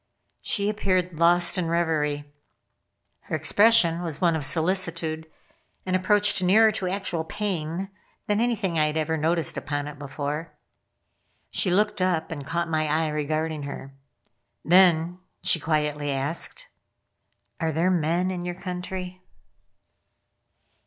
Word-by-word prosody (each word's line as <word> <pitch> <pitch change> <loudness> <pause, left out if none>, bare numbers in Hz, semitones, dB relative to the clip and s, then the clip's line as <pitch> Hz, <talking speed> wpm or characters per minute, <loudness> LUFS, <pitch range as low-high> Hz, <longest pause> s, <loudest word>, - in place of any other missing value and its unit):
She 200 -1 -1
appeared 185 -5 0
lost 175 +2 +4
in 170 - -1
reverie. 155 -3 0 1.0
Her - - -3
expression 205 -6 +4
was 160 -4 -4
one 170 -2 +3
of 155 - -2
solicitude 165 -1 0 0.6
and 185 0 0
approached 205 +1 +2
nearer 215 +5 +5
to 195 -3 -3
actual 180 -4 -2
pain 175 -1 -3 0.4
than 210 +1 +1
anything 215 -8 0
I 155 - +3
had 150 +1 -2
ever 160 +1 0
noticed 160 0 0
upon 145 0 -3
it 145 -1 -9
before. 145 +3 -5 1.0
She 190 - +1
looked 205 +2 +1
up 175 -4 0
and 145 -3 -5
caught 170 0 -1
my 155 -1 0
eye 155 +1 +1
regarding 155 +1 -2
her. 140 -1 -7 0.7
Then 175 -1 +4 0.2
she 185 -3 +3
quietly 150 -2 -1
asked: 145 - -2 0.9
"_Are 160 -1 0
there 165 +4 +1
men 175 +2 +1
in 180 -1 -4
your 175 0 -4
country? 180 0 -6
170 Hz, 130 wpm, -25 LUFS, 155-185 Hz, 1.0 s, nearer